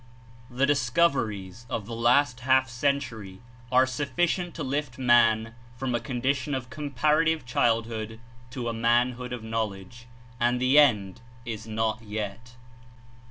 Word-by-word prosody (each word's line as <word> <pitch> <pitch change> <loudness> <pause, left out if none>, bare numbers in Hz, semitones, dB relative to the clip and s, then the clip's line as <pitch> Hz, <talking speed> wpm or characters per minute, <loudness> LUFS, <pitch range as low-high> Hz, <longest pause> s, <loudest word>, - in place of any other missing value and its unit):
The 130 +2 +1
discoveries 120 - 0
of 110 - -3
the 115 - -7
last 125 +2 +3
half 130 +1 +3
century 120 -7 -2 0.3
are 130 +1 +5
suf 135 +2 -3
ficient 175 0 0
to 160 - -5
lift 135 -2 -3
man 115 -3 +3 0.2
from 130 0 -2
a 120 - +1
condition 135 +2 -1
of 125 -1 -6
comparative 150 +2 +1
childhood 115 -2 -1 0.3
to 125 -1 -5
a 115 - -1
manhood 120 +2 +1
of 125 -2 -5
knowledge, 110 0 -5 0.3
and 120 +1 +2
the 130 +4 +5
end 110 -7 +3 0.2
is 110 -1 -6
not 110 +1 -1
yet. 110 +3 -6
120 Hz, 135 wpm, -26 LUFS, 115-135 Hz, 0.3 s, are